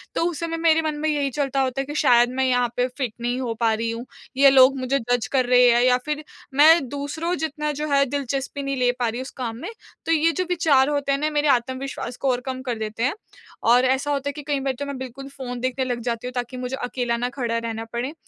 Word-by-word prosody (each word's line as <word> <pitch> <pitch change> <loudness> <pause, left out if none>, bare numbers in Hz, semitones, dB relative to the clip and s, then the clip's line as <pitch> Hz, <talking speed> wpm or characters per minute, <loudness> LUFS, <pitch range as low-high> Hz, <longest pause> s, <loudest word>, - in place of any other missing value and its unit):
तो - - +1
उस 330 - -6
समय 330 0 -3
मेरे 325 -1 +3
मन 310 -1 -2
में 310 - 0
यही 285 -2 0
चलता 275 -1 +1
होता 265 0 -1
है - - -5
कि 295 - -7
शायद 240 -1 +5
मैं 265 - +3
यहाँ 245 -1 +2
पे 250 +1 +2
फिट 250 -3 -4
नहीं 245 +1 -1
हो 235 -3 -2
पा 225 -2 +3
रही 230 +1 -2
हूँ। 230 +2 -6 0.3
ये 275 0 +7
लोग 270 0 +6
मुझे 265 +2 0
जज़ 245 -3 +1
कर 260 -2 +2
रहे 250 0 +6
हैं 240 0 +4
या 250 0 +4
फिर 300 0 -3 0.3
मैं 300 0 +6
दूसरों 285 +5 -3
जितना 300 -2 -2
जो 305 - -1
है 280 0 +5
दिलचस्पी 280 0 -3
नहीं 275 0 -2
ले 250 -1 +3
पा 240 - +1
रही 235 +2 -4
हूँ - - -3
उस 265 - -8
काम 230 -3 -3
में। 345 - -5 0.4
तो 330 - 0
ये 325 +1 +3
जो 370 - +1
विचार 295 -6 +3
होते 285 -1 0
हैं 275 - +1
ना 305 +1 0
मेरे 295 0 +1
आत्मविश्वास 260 0 -1
को 270 - -1
और 245 0 -1
कम 260 -1 -4
कर 245 -3 -3
देते 220 +1 -4
हैं। 265 - +2 0.6
और 250 +2 +5
ऐसा 265 +3 +1
होता 280 0 -1
है - - -4
कि 295 - -7
कई 285 -1 0
बार 270 -1 -1
तो 285 - -3
मैं 280 -2 -5
बिल्कुल 260 +1 -8
फ़ोन 255 -3 -6
देखने 255 +1 -1
लग 245 -1 -2
जाती 235 +1 -2
हूँ 250 - -5
ताकि 245 +1 -4
मुझे 250 +1 -3
अकेला 245 -1 -1
ना 245 +1 -1
खड़ा 240 -3 -2
रहना 225 -1 -4
पड़े। 250 +5 -3
265 Hz, 265 wpm, -23 LUFS, 245-285 Hz, 0.6 s, ये